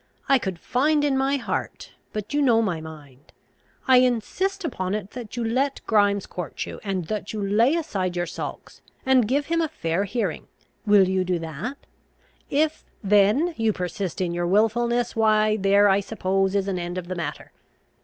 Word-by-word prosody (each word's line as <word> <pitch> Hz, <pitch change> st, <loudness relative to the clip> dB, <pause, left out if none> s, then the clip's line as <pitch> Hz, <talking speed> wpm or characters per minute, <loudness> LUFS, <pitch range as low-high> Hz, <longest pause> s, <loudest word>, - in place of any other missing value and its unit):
I 275 Hz, -1 st, +5 dB
could 190 Hz, -6 st, -4 dB
find 290 Hz, -, +1 dB
in 285 Hz, -2 st, +2 dB
my 270 Hz, +1 st, +1 dB
heart 265 Hz, -, -4 dB, 0.2 s
But 210 Hz, +4 st, -5 dB
you 295 Hz, -, +2 dB
know 240 Hz, -5 st, +4 dB
my 185 Hz, -8 st, -1 dB
mind. 150 Hz, -3 st, -12 dB, 0.6 s
I 260 Hz, -1 st, +7 dB
insist 295 Hz, -, 0 dB
upon 190 Hz, -, -2 dB
it 210 Hz, -2 st, -5 dB
that 245 Hz, -2 st, -8 dB
you 240 Hz, -, -1 dB
let 265 Hz, +5 st, 0 dB
Grimes 205 Hz, -2 st, +2 dB
court 175 Hz, -4 st, -5 dB
you, -, -, -8 dB
and 190 Hz, -4 st, -2 dB
that 210 Hz, +3 st, -4 dB
you 205 Hz, -2 st, -2 dB
lay 230 Hz, +9 st, +3 dB
aside 195 Hz, -, -2 dB
your 175 Hz, 0 st, -1 dB
sulks, -, -, -7 dB, 0.2 s
and 260 Hz, -4 st, +4 dB
give 285 Hz, +4 st, +1 dB
him 335 Hz, +2 st, 0 dB
a 325 Hz, -, +1 dB
fair 180 Hz, -, -2 dB
hearing. 230 Hz, +4 st, -3 dB, 0.4 s
Will 205 Hz, -2 st, +6 dB
you 185 Hz, 0 st, +1 dB
do 180 Hz, -1 st, 0 dB
that? 165 Hz, -, -5 dB, 0.7 s
If 305 Hz, +2 st, 0 dB, 0.2 s
then 210 Hz, -, +3 dB
you 225 Hz, -2 st, +1 dB
persist 180 Hz, 0 st, -4 dB
in 175 Hz, -2 st, -1 dB
your 175 Hz, 0 st, -1 dB
wilfulness, 235 Hz, +5 st, +1 dB
why 215 Hz, -1 st, +3 dB
there, 200 Hz, +1 st, +4 dB
I 195 Hz, 0 st, +4 dB
suppose, 195 Hz, -1 st, -1 dB
is 200 Hz, -1 st, +1 dB
an 190 Hz, -2 st, -1 dB
end 175 Hz, +1 st, -4 dB
of 180 Hz, -1 st, -5 dB
the 185 Hz, -, -3 dB
matter. 160 Hz, -5 st, -5 dB
210 Hz, 185 wpm, -24 LUFS, 185-250 Hz, 0.7 s, I